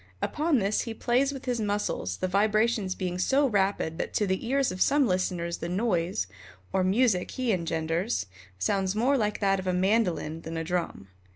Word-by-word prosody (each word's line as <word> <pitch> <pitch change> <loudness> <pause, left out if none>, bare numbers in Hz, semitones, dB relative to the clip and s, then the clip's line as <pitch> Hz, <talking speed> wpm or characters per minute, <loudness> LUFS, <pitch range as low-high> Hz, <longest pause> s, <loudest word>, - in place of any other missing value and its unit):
Upon 305 - +1
this 205 -1 +1
he 230 -2 -5
plays 255 +5 +1
with 270 -2 -8
his 245 -3 -1
muscles, 205 - -2
the - - -1
vibrations 215 +1 +1
being 180 -1 -3
so 275 +9 +3
rapid 195 -7 0
that - - -3
to 210 - +2
the 190 +4 -2
ears 270 -1 +2
of 185 0 -6
some 285 -1 +4
listeners 180 -3 -1
the 170 - -4
noise, 180 - 0 0.5
or 190 - +2
music 195 0 +2
he 255 -3 -1
engenders, 165 +3 -1 0.3
sounds 190 - 0
more 250 +6 +3
like 210 -5 0
that 195 -1 +2
of 185 - -5
a 185 - +1
mandolin 180 -4 +1
than 165 0 -6
a 165 - -2
drum. 165 - -3
195 Hz, 185 wpm, -27 LUFS, 180-235 Hz, 0.5 s, some